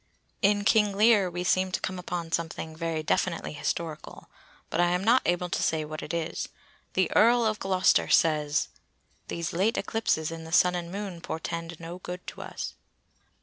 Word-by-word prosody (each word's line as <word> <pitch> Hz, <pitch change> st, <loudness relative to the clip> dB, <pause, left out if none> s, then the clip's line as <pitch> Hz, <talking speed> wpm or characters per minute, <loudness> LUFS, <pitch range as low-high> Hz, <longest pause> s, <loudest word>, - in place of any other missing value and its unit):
In 205 Hz, +1 st, +3 dB
King 210 Hz, -2 st, +3 dB
Lear 210 Hz, -3 st, +5 dB
we 175 Hz, 0 st, -4 dB
seem 185 Hz, +1 st, +2 dB
to -, -, +1 dB
come 185 Hz, -1 st, -3 dB
upon 175 Hz, -2 st, -4 dB
something 160 Hz, -1 st, -3 dB
very 165 Hz, -1 st, -2 dB
definitely 170 Hz, +1 st, 0 dB
historical, 155 Hz, +1 st, -4 dB, 0.4 s
but -, -, -1 dB
I 175 Hz, -, +4 dB
am 180 Hz, +1 st, 0 dB
not 240 Hz, +5 st, +5 dB
able 175 Hz, +1 st, +1 dB
to -, -, -1 dB
say 155 Hz, -1 st, +1 dB
what 155 Hz, 0 st, -6 dB
it -, -, -6 dB
is. 170 Hz, -1 st, -3 dB, 0.4 s
The -, -, +1 dB
Earl 235 Hz, +1 st, +5 dB
of 215 Hz, -1 st, 0 dB
Gloster 185 Hz, -1 st, +3 dB
says:— 150 Hz, -2 st, +3 dB, 0.6 s
"These 170 Hz, 0 st, -3 dB
late 195 Hz, +7 st, +1 dB
eclipses 165 Hz, -8 st, 0 dB
in 165 Hz, 0 st, -7 dB
the 160 Hz, -, -9 dB
Sun 180 Hz, +1 st, +5 dB
and 175 Hz, -1 st, -4 dB
Moon 195 Hz, -3 st, -5 dB
portend 165 Hz, 0 st, -5 dB
no 170 Hz, +2 st, -7 dB
good 180 Hz, 0 st, -7 dB
to -, -, -10 dB
us." -, -, -6 dB
175 Hz, 180 wpm, -28 LUFS, 165-195 Hz, 0.6 s, Lear